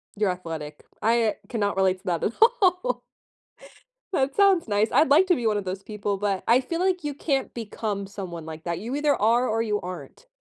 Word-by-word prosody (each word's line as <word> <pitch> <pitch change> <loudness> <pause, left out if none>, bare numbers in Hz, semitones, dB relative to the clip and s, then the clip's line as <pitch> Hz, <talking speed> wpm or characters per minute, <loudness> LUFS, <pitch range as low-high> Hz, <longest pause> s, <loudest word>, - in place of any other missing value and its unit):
You're 205 -2 +1
athletic, 160 -4 -7 0.2
I 225 0 +2
cannot 205 -4 -1
relate 190 -1 +2
to 195 - -29
that 170 -3 -1
at 230 - 0
all. 390 -1 +3 1.1
That 270 -4 0
sounds 390 - +4
nice. 210 +1 +2
I'd 300 -2 +4
like 320 +7 +6
to 355 - +4
be 235 -4 -1
one 210 - +2
of 205 - -3
those 185 +1 -4
people, 205 -1 -3
but 200 -2 -1
I 245 +3 +5
feel 335 +6 -4
like 365 -2 +1
you 290 -1 -3
can't 275 -2 -1
become 210 -3 -4
someone 185 -5 -7
like 160 0 -8
that, 170 -1 -2
you 235 +7 -4
either 290 0 +2
are 235 +4 +2
or 225 +1 0
you 210 -2 -1
aren't. 185 - -9
215 Hz, 210 wpm, -25 LUFS, 195-285 Hz, 1.1 s, like